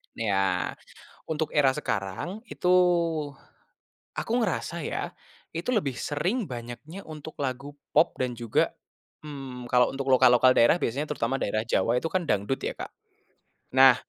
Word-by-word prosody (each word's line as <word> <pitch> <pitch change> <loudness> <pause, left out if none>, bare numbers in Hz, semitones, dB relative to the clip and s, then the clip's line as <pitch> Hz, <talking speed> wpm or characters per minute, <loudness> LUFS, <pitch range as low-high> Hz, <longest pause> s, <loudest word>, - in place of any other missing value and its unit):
Iya, 100 -4 +1 0.6
untuk 160 0 -2
era 140 -3 +5
sekarang 145 - -3
itu, - - -3 1.5
aku - - -3
ngerasa 170 -4 -1
ya, - - -3 0.4
Itu 165 +7 -3
lebih 190 - +1
sering 170 - -2
banyaknya, 125 +10 -8
untuk 155 0 -9
lagu 140 +1 -4 0.2
pop 155 +3 +4
dan 125 -1 -1
juga, 115 -2 0 0.5
mmm, 135 -5 -8
kalau 125 +1 +4
untuk 135 0 -3
lokal-lokal 130 -1 +6
daerah, 120 +9 +5
biasanya 140 +6 -1
terutama 135 -1 -1
daerah 110 -3 0
Jawa 115 -1 +1
itu 165 - -2
kan 185 -1 -1
dangdut 105 +1 0
ya, - - -1
Kak? - - -7 0.9
Nah, 130 -1 +9
135 Hz, 135 wpm, -27 LUFS, 120-160 Hz, 1.5 s, Nah